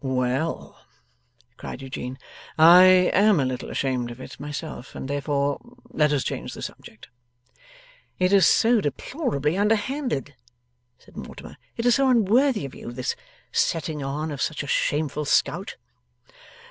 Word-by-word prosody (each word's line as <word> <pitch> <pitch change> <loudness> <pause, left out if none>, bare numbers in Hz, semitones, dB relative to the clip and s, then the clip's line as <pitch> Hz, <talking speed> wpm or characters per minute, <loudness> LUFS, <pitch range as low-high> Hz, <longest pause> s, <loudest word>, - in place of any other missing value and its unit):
'Well!' 130 +4 -2 0.7
cried 135 - -8
Eugene, 130 -1 -6 0.4
'I 170 +3 +9 0.3
am 200 -2 +4
a 135 - +1
little 130 -1 -4
ashamed 125 -3 -2
of 120 +1 -10
it - - -10
myself, 145 -2 -7
and - - -6
therefore 140 0 -1 0.3
let 150 -1 +2
us 145 -3 +1
change - - -5
the - - -8
subject.' 110 - -10 1.1
'It 185 +1 +1
is 195 -2 +6
so 230 -1 +4
deplorably 150 - -2
underhanded,' 220 - -1 0.6
said - - -21
Mortimer. - - -9 0.2
'It 230 - -3
is 245 - +5
so 270 +1 +3
unworthy 235 - +3
of 135 - -8
you, - - -8
this 125 +1 -3 0.4
setting 160 -2 -1
on 145 +3 -3
of 140 - -5
such 155 -2 -2
a - - -8
shameful 150 +2 0
scout. 145 - 0
150 Hz, 140 wpm, -24 LUFS, 135-200 Hz, 1.1 s, I